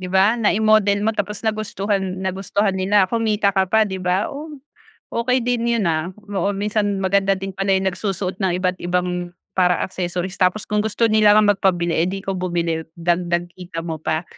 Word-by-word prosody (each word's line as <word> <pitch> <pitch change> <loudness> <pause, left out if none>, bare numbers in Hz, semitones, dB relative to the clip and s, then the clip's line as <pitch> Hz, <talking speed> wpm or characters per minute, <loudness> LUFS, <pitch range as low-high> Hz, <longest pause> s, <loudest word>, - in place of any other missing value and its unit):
Di 185 - -5
ba 190 +3 +4
nai-model 210 -2 +3
mo 220 - +2
tapos 210 +1 -4
nagustuhan 210 -2 -1 0.2
nagustuhan 195 +2 0
nila, 190 +1 +3
kumita 215 -3 +1
ka 190 -1 +1
pa, 220 +2 +4
'di 190 -2 -5
ba? 185 +2 0
Oh, 295 +3 -7 0.6
okey 250 +2 0
din 240 -1 -1
'yon, 225 -4 +1
ah. 160 +3 -1 0.2
Oo 200 +2 +1
minsan 205 0 -1
maganda 195 +1 +2
din 195 0 -4
pala 195 0 +1
yung 190 0 +2
nagsusuot 190 0 -3
ng 190 -2 +2
iba't 185 -1 0
ibang 180 0 -1 0.2
para 180 -1 +4
accessories 180 0 -4
tapos 185 +3 +2
kung 210 0 0
gusto 220 +2 0
nila 215 -1 +5
nga 215 - +6
magpabili 175 -3 +1 0.2
'di 195 +1 -5
ikaw 195 - -2
nabumili 170 -3 -1
dagdag 175 0 0
kita 175 -2 -7
mo 160 -2 -3
pa. 155 +2 -1
195 Hz, 180 wpm, -21 LUFS, 180-210 Hz, 0.6 s, nga